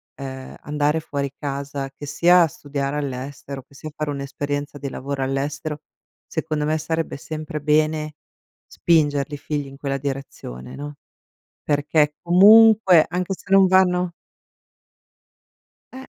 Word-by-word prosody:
ehm, 130 Hz, -1 st, -8 dB
andare 150 Hz, +1 st, 0 dB
fuori 140 Hz, -3 st, -4 dB
casa, 140 Hz, -1 st, -4 dB
che 145 Hz, -, -8 dB
sia 170 Hz, +3 st, +5 dB
studiare 140 Hz, 0 st, -4 dB
all'estero, 140 Hz, 0 st, -5 dB
che 140 Hz, -, -23 dB
sia 155 Hz, +2 st, -8 dB
fare 150 Hz, -1 st, -3 dB
un'esperienza 145 Hz, +1 st, -4 dB
di 140 Hz, -, -4 dB
lavoro 135 Hz, +1 st, -4 dB
all'estero, 145 Hz, +3 st, -3 dB, 0.4 s
secondo 150 Hz, -1 st, -2 dB
me 155 Hz, +1 st, +1 dB
sarebbe 160 Hz, 0 st, -3 dB
sempre 155 Hz, 0 st, -6 dB
bene 155 Hz, 0 st, +1 dB, 0.5 s
spingerli 145 Hz, -3 st, +1 dB
i -, -, -7 dB
figli 145 Hz, 0 st, -4 dB
in 135 Hz, 0 st, -12 dB
quella 140 Hz, -1 st, -2 dB
direzione, 135 Hz, -, -6 dB
no, 145 Hz, +1 st, -7 dB, 0.7 s
perché 150 Hz, 0 st, +1 dB
comunque, 200 Hz, 0 st, +7 dB
anche 180 Hz, +2 st, -2 dB
se 195 Hz, +2 st, -15 dB
non 195 Hz, -1 st, +7 dB
vanno 180 Hz, -1 st, +3 dB, 1.8 s
Eh. 265 Hz, +1 st, -9 dB
145 Hz, 125 wpm, -22 LUFS, 140-160 Hz, 1.8 s, comunque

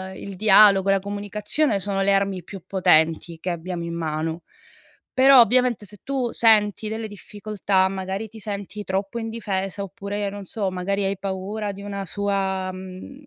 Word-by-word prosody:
il 200 Hz, 0 st, -8 dB
dialogo 200 Hz, -1 st, +6 dB
e -, -, +6 dB
la 195 Hz, -, +3 dB
comunicazione 205 Hz, +5 st, -1 dB
sono 195 Hz, 0 st, -2 dB
le 200 Hz, +1 st, +3 dB
armi 195 Hz, -2 st, 0 dB
più 195 Hz, +1 st, -9 dB
potenti 165 Hz, -3 st, +2 dB
che 180 Hz, -, -4 dB
abbiamo 175 Hz, 0 st, -4 dB
in 170 Hz, 0 st, -4 dB
mano. 160 Hz, +1 st, -3 dB, 0.7 s
Però, 260 Hz, 0 st, +8 dB
ovviamente, 245 Hz, -1 st, +2 dB
se 205 Hz, 0 st, -10 dB
tu 260 Hz, -3 st, -1 dB
senti 215 Hz, -2 st, +3 dB
delle 220 Hz, +1 st, -4 dB
difficoltà, 205 Hz, -2 st, -1 dB
magari 190 Hz, +2 st, -4 dB
ti 220 Hz, +1 st, -12 dB
senti 205 Hz, 0 st, -5 dB
troppo 195 Hz, +4 st, -2 dB
indifesa 200 Hz, -4 st, -3 dB
oppure, 200 Hz, +1 st, -4 dB
non 200 Hz, 0 st, -8 dB
so, 195 Hz, 0 st, -2 dB
magari 195 Hz, +2 st, -1 dB
hai 195 Hz, 0 st, -1 dB
paura 200 Hz, +2 st, -3 dB
di 200 Hz, -, -10 dB
una 200 Hz, -1 st, -5 dB
sua, 195 Hz, -1 st, -1 dB
mhmm 185 Hz, +9 st, -10 dB
200 Hz, 165 wpm, -23 LUFS, 190-210 Hz, 0.7 s, Però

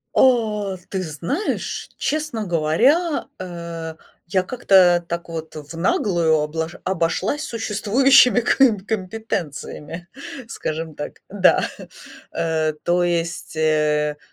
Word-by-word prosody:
О, 215 Hz, -6 st, +3 dB
ты 190 Hz, -, -2 dB
знаешь, 175 Hz, -, -3 dB
честно 300 Hz, -8 st, -2 dB
говоря, 235 Hz, -, +2 dB
э, 170 Hz, -3 st, -6 dB, 0.3 s
я 185 Hz, +1 st, +1 dB
как-то 185 Hz, -6 st, +4 dB
так, 170 Hz, 0 st, -3 dB
вот, 160 Hz, -1 st, -7 dB
в 150 Hz, +1 st, -8 dB
наглую 170 Hz, -1 st, +2 dB
облош 160 Hz, +3 st, -3 dB
обошлась 185 Hz, -, 0 dB
существующими 235 Hz, +3 st, +4 dB
ком 240 Hz, -2 st, +4 dB
компетенциями, 185 Hz, -6 st, -4 dB, 0.4 s
скажем 160 Hz, -6 st, -4 dB
так, 145 Hz, -, -7 dB
да. 195 Hz, -1 st, +4 dB, 0.7 s
Э, 160 Hz, -1 st, 0 dB
то 175 Hz, +1 st, +2 dB
есть, 170 Hz, -2 st, -2 dB
э, 150 Hz, -1 st, +1 dB
175 Hz, 100 wpm, -21 LUFS, 160-220 Hz, 0.7 s, как-то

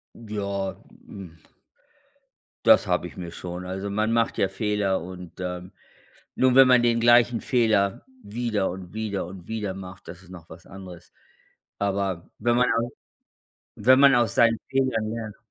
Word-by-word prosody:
ja, 100 Hz, -3 st, -4 dB, 0.3 s
hm 90 Hz, -5 st, -11 dB, 1.3 s
das -, -, +6 dB
habe -, -, 0 dB
ich -, -, -9 dB
mir 85 Hz, -2 st, -7 dB
schon. 90 Hz, +1 st, -7 dB
Also, 95 Hz, +2 st, -5 dB
man 110 Hz, +2 st, 0 dB
macht 115 Hz, 0 st, 0 dB
ja 95 Hz, -, +2 dB
Fehler 105 Hz, -2 st, -1 dB
und, 90 Hz, -1 st, -10 dB
ähm, 90 Hz, 0 st, -5 dB, 0.6 s
nur, 130 Hz, 0 st, +2 dB
wenn 135 Hz, -1 st, +9 dB
man 125 Hz, -1 st, +5 dB
den 120 Hz, -1 st, +2 dB
gleichen 120 Hz, 0 st, +4 dB
Fehler 110 Hz, -3 st, +1 dB, 0.2 s
wieder 110 Hz, -2 st, -2 dB
und 90 Hz, 0 st, -9 dB
wieder 110 Hz, -4 st, -3 dB
und 90 Hz, -1 st, -11 dB
wieder 105 Hz, -3 st, -3 dB
macht, 95 Hz, 0 st, -11 dB
das 90 Hz, +1 st, -10 dB
ist -, -, -18 dB
noch 85 Hz, -3 st, -12 dB
was 85 Hz, +2 st, -13 dB
anderes. 90 Hz, -3 st, -12 dB, 0.7 s
Aber 95 Hz, -3 st, -2 dB
wenn 120 Hz, +2 st, +1 dB
man 125 Hz, 0 st, +3 dB
aus 115 Hz, +1 st, -1 dB, 0.9 s
wenn 130 Hz, +5 st, +5 dB
man 140 Hz, -1 st, +7 dB
aus 120 Hz, -4 st, +2 dB
seinen 115 Hz, -1 st, +4 dB
Fehlern 130 Hz, -5 st, 0 dB
lernt 110 Hz, -2 st, -6 dB
100 Hz, 160 wpm, -25 LUFS, 95-115 Hz, 1.3 s, wenn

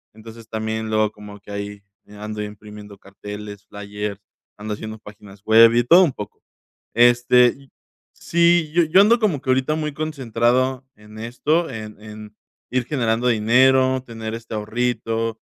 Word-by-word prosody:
Entonces, 115 Hz, 0 st, -13 dB
también 110 Hz, 0 st, -3 dB
luego 110 Hz, -1 st, +1 dB
como 105 Hz, -1 st, -12 dB
que 100 Hz, -, -14 dB
ahí 100 Hz, 0 st, -6 dB, 0.3 s
ando 105 Hz, +1 st, -7 dB
imprimiendo 105 Hz, 0 st, -10 dB
carteles, 105 Hz, +1 st, -10 dB
flyers, 105 Hz, 0 st, -6 dB, 0.4 s
ando 105 Hz, 0 st, -5 dB
haciendo 110 Hz, +1 st, -7 dB
páginas 105 Hz, -1 st, -15 dB
web 115 Hz, +1 st, +7 dB
y 120 Hz, -, +3 dB
todo 175 Hz, +8 st, +7 dB
un 160 Hz, -, +2 dB
poco. 105 Hz, -3 st, -9 dB, 0.5 s
Este, 120 Hz, +1 st, +4 dB
y 135 Hz, -1 st, -19 dB, 0.5 s
Sí, 170 Hz, -2 st, +2 dB
yo 175 Hz, -, +4 dB
yo 170 Hz, +5 st, +4 dB
ando 230 Hz, +4 st, +5 dB
como 190 Hz, -, 0 dB
que 135 Hz, -, -3 dB
ahorita 130 Hz, +4 st, +1 dB
muy 150 Hz, -1 st, -3 dB
concentrado 130 Hz, -3 st, -1 dB
en 105 Hz, 0 st, -15 dB
esto, 150 Hz, +9 st, -1 dB
en 110 Hz, -2 st, -8 dB
en 105 Hz, 0 st, -11 dB, 0.3 s
ir 130 Hz, -1 st, 0 dB
generando 120 Hz, -4 st, -1 dB
dinero, 130 Hz, +3 st, +3 dB
tener 115 Hz, -1 st, -6 dB
este 115 Hz, -1 st, -8 dB
ahorrito. 115 Hz, 0 st, -2 dB
115 Hz, 150 wpm, -21 LUFS, 105-130 Hz, 0.5 s, web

